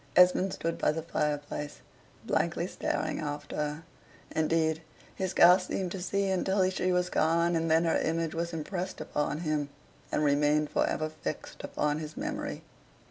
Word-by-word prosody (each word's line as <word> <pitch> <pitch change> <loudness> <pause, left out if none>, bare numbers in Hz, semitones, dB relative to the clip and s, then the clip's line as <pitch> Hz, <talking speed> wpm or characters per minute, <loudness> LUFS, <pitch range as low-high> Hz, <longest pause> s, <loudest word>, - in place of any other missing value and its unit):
Esmond 180 +1 +5
stood 165 -1 -3
by - - +3
the 160 +1 -4
fireplace, 150 -2 -2 0.4
blankly - - 0
staring - - -2
after 145 -1 -4
her. 150 +1 -2 0.5
Indeed, 160 0 +1 0.3
he 190 - -2
scarce 180 +1 +6
seemed 185 -2 -2
to 190 - -4
see 200 +2 0
until 190 0 +2
she 185 0 0
was 180 0 +1
gone; 170 +2 +2
and 165 0 0
then 160 +1 +4
her 165 - +2
image 165 0 -1
was 170 +1 -2
impressed 175 +3 -4
upon 150 +1 -2
him, 155 -3 -1 0.4
and - - +1
remained 150 +1 +3
for - - +2
ever 155 - -1
fixed 155 - -6
upon 150 0 -1
his 155 0 -7
memory. - - -4
165 Hz, 160 wpm, -30 LUFS, 150-180 Hz, 0.5 s, scarce